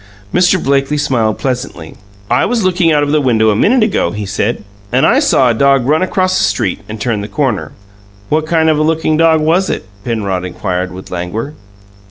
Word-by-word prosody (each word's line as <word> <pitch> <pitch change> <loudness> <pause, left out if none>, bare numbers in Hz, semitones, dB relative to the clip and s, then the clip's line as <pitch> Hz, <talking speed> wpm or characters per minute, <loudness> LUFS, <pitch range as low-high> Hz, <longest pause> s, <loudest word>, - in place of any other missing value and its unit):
Mr. 180 +1 +3
Blakely 140 +2 +1
smiled 120 -7 0
pleasantly. 125 - -4 0.3
"I 120 - +2
was 235 -3 0
looking 180 -2 +2
out 150 -1 +2
of 145 - -1
the 150 0 +2
window 110 -5 +2
a - - 0
minute 230 - +3
ago," 205 - 0
he 105 +4 -5
said, 105 +4 -2 0.3
"and 125 +2 +3
I 260 - +4
saw 210 - +3
a 120 - +3
dog 135 +1 +2
run 155 +5 +2
across 185 0 0
the - - +1
street - - -1
and 110 0 -6
turn 110 -1 -1
the 100 - -5
corner." 120 0 -2 0.6
"What 155 +4 0
kind 160 -1 +2
of 155 -1 +2
a - - +1
lookin' 160 0 +1
dog 160 0 +3
was 170 +5 +1
it?" - - -3 0.2
Penrod 100 -6 -2
inquired, 90 0 -3
with 95 +1 -10
languor. 90 +10 -4
135 Hz, 205 wpm, -14 LUFS, 110-160 Hz, 0.6 s, I